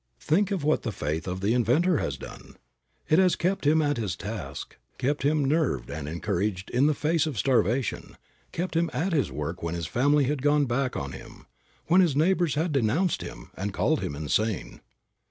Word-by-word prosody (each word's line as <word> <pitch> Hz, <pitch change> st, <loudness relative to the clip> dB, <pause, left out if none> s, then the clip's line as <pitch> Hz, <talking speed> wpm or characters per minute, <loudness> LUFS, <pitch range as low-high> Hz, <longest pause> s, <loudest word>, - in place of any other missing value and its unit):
Think 190 Hz, +6 st, +2 dB
of 195 Hz, -7 st, -2 dB
what 155 Hz, +1 st, +2 dB
the 115 Hz, -, -3 dB
faith 80 Hz, -1 st, -3 dB
of 90 Hz, +1 st, -3 dB
the 105 Hz, +3 st, +2 dB
inventor 145 Hz, -, +3 dB
has -, -, -2 dB
done! -, -, -11 dB, 0.5 s
It 155 Hz, -, +4 dB
has 185 Hz, -2 st, +4 dB
kept 180 Hz, -3 st, 0 dB
him 155 Hz, +1 st, +4 dB
at 145 Hz, -1 st, 0 dB
his 105 Hz, -6 st, -2 dB
task, 95 Hz, -9 st, -7 dB, 0.2 s
kept 140 Hz, +3 st, -1 dB
him 145 Hz, +1 st, +2 dB
nerved 135 Hz, -, 0 dB
and 75 Hz, 0 st, -5 dB
encouraged 95 Hz, +3 st, -2 dB
in 130 Hz, +4 st, +3 dB
the 155 Hz, -, +2 dB
face 160 Hz, +2 st, +1 dB
of 145 Hz, -7 st, -4 dB
starvation, 120 Hz, 0 st, 0 dB, 0.3 s
kept 175 Hz, 0 st, -3 dB
him 165 Hz, 0 st, +2 dB
at 175 Hz, +4 st, -1 dB
his 145 Hz, -4 st, +1 dB
work 75 Hz, +4 st, -4 dB
when 85 Hz, 0 st, -3 dB
his 85 Hz, -2 st, -3 dB
family 140 Hz, -, +2 dB
had 140 Hz, +1 st, -1 dB
gone 145 Hz, +1 st, +3 dB
back 125 Hz, +1 st, -1 dB
on 70 Hz, 0 st, -4 dB
him, -, -, -11 dB, 0.4 s
when 180 Hz, +3 st, +5 dB
his 165 Hz, -7 st, +2 dB
neighbors 170 Hz, 0 st, +2 dB
had 160 Hz, +3 st, 0 dB
denounced 145 Hz, -, +1 dB
him, -, -, -9 dB
and 100 Hz, +1 st, -4 dB
called -, -, +2 dB
him 70 Hz, -, -3 dB
insane. 95 Hz, +8 st, -2 dB
135 Hz, 195 wpm, -27 LUFS, 100-155 Hz, 0.5 s, when